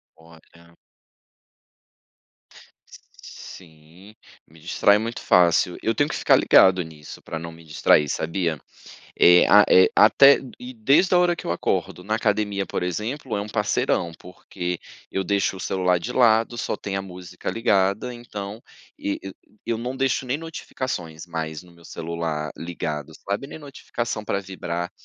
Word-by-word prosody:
Olha 85 +1 -20 2.5
Sim, 85 +4 -14 0.3
me 80 +1 -19
distrai 100 +5 +3
muito 115 +2 -4
fácil. 90 0 +3
Eu 115 - 0
tenho 145 0 +1
que - - -3
ficar - - +4
ligado 95 -1 +5
nisso 75 -2 -12
para 80 - -6
não 85 +1 -7
me 85 0 -15
distrair, 75 -1 +2
sabia 85 -1 -2 0.6
é 90 0 +7
a 105 - +7
é 95 - +6
até 140 0 +7 0.2
e 125 +1 -8
desde 140 - +3
a - - +6
hora 175 -1 +2
que - - -9
eu - - -2
acordo, 90 +1 -2
na 110 - -1
academia, 105 -2 0
por - - -4
exemplo, 110 - -3
é - - -1
um 100 - -6
parceirão, 105 -5 0
porque 90 -1 -6 0.3
eu 95 - -1
deixo 100 -1 0
o - - -9
celular 90 -1 +1
de 110 +9 -6
lado, 115 -1 +3
só 110 - -2
tem 100 -1 -5
a 95 - -2
música 90 -1 -7
ligada, 100 +1 +1
então 105 -2 -8 0.4
e 100 - -3 0.5
e - - -3
eu 115 - +1
não 125 +3 -5
deixo 135 0 0
nem 130 +3 -1
notificações 130 - -6
mais 80 -2 -5
no 90 - -18
meu 85 0 -20
celular 80 -3 -4
ligado, 80 -3 -5 0.2
sabe, 100 +7 -2
nem 145 - -10
notificação 120 -6 -5
para 100 - -1
vibrar. 90 -3 -5
95 Hz, 155 wpm, -23 LUFS, 85-115 Hz, 2.5 s, é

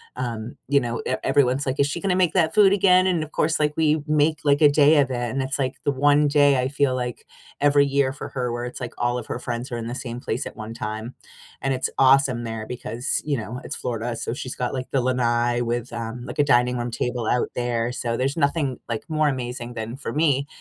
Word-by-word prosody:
Um, 120 -2 -4
you 140 0 +5
know, 120 -2 -3
e 130 - 0
everyone's, 135 0 +2
like, 130 -1 -2
"Is 140 - +3
she 145 - -3
gonna 195 -2 0
make 180 -2 +3
that 160 -3 +3
food 200 -2 +6
again?" 185 -2 +5
And 175 -4 +1
of 155 - -7
course, 160 0 +1
like, 150 0 +1
we 155 -1 +2
make, 150 0 +2
like, 145 +1 +3
a 150 - +8
day 145 +1 +5
of 135 -1 -1
it, - - -1
and 135 +3 -2
it's, 135 +2 -3
like, 130 -1 -1
the 145 - +2
1 145 +2 +3
day 145 -1 +4
I 130 - -1
feel 140 -2 +1
like 125 -1 -4 0.3
every 145 0 +4
year 140 -1 +1
for - - -7
her 125 -2 -2
where 120 0 -3
it's, 125 - -6
like, 125 -2 -6
all 120 +1 0
of 120 - -5
her - - -4
friends 120 +1 -5
are - - -2
in 115 - -5
the 120 - -4
same 120 -1 -6
place - - -3
at - - -8
1 110 0 -7
time. 110 +2 -5 0.5
And 135 0 0
it's 130 - -1
awesome 130 -3 +4
there 115 -1 -5
because, 120 +2 -3
you 145 -2 0
know, 115 +2 -5
it's - - -4
Florida, 120 0 -3
so, - - -4
she's 130 0 -6
got, 125 -1 -2
like, 130 -1 -4
the 135 - +2
lanai 120 -1 +1
with, 120 0 -2
um, 115 +1 -5
like, - - -8
a - - +6
dining 125 -2 +3
room 120 0 -3
table 120 -1 -2
out 125 - +1
there. 120 -1 -1
So, 120 -1 -2
there's 135 +5 -1
nothing, 140 -3 0
like, 115 -2 -3
more 155 -1 +2
amazing 125 -2 -3
than 115 +2 -5
for 135 -4 -5
me 145 -3 +2
130 Hz, 245 wpm, -23 LUFS, 120-145 Hz, 0.5 s, a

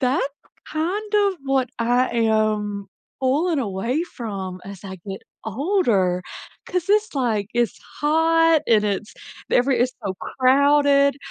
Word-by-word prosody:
that's 260 +1 +1 0.4
kind 400 +7 -2
of 405 -2 +3
what 270 -2 +1
I 245 +2 +2
am 215 -3 0 0.3
pulling 295 +5 +1
away 230 - -1
from 195 - -6
as 200 0 -10
I 190 -1 -7
get 195 0 -6 0.2
older 220 - +1 0.4
'cause 360 0 -2
it's 425 -1 +2
like, 220 -7 0
it's 240 -3 0 0.2
hot 325 +1 +3
and 215 -2 +4
it's 205 +1 -2 0.4
every 255 +1 +3
it's 250 +1 +2
so 190 - -2
crowded. 280 +1 +3
255 Hz, 125 wpm, -22 LUFS, 210-310 Hz, 0.4 s, and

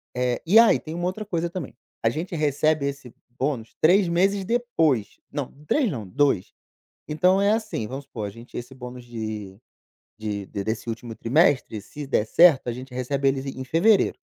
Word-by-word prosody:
eh 125 -1 0
e 190 +7 +5
aí 230 0 +7
tem 160 +1 -7
uma 175 +1 -2
outra 190 +4 -3
coisa 170 -4 -2
também, 170 -9 -6 0.3
a 115 - +4
gente 170 +7 -4
recebe 150 -1 +1
esse 140 -4 -7 0.2
bônus 130 -5 -2
3 185 +4 +5
meses 190 +4 +2
depois 165 - 0
não, 145 -3 -4 0.2
3 270 - +2
não, 110 -8 -5
2. 135 -2 +1 0.6
Então, 180 +6 +3
é 200 +1 +4
assim, 215 - -2
vamos 135 +5 -6
supor, 110 -6 -5
a - - -5
gente 115 +4 -12
esse 125 +2 -7
bônus 125 -1 -9
de 110 -4 -6 0.6
de 105 -2 -4
desse 110 +4 -4
último 115 0 -6
trimestre, 130 - +2
se 145 +7 -8
der 110 -5 +1
certo, 155 +1 +5
a - - 0
gente 130 +1 -9
recebe 135 +2 -1
ele 135 0 -1 0.2
em - - -3
fevereiro. 190 - +3
140 Hz, 180 wpm, -24 LUFS, 115-170 Hz, 0.6 s, aí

